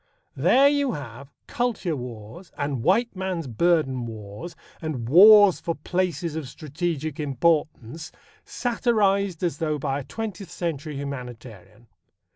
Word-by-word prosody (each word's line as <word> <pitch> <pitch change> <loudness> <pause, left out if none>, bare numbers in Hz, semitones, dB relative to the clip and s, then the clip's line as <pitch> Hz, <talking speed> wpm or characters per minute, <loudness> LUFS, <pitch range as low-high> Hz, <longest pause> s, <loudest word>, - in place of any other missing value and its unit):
There 240 - +5
you 285 -3 +1
have 140 0 -9 0.2
"Kultur" 235 -9 -1
wars, 120 - -9
and 140 -4 -2
"white 210 - +2
man's 185 -3 -3
burden" 135 -1 +1
wars, 110 - -8 0.3
and 145 -8 -4
wars 205 - +8
for 170 - -3
"places 175 -3 -2
of 155 -5 -5
strategic 155 +1 -4
importance," 150 0 -1 0.3
satirized 200 -7 0
as 165 -5 -1
though 155 -2 -1
by 140 -1 -2
a - - -6
twentieth 200 - -6
century 160 -4 -4
humanitarian. 120 -6 -8
155 Hz, 120 wpm, -24 LUFS, 130-185 Hz, 0.3 s, wars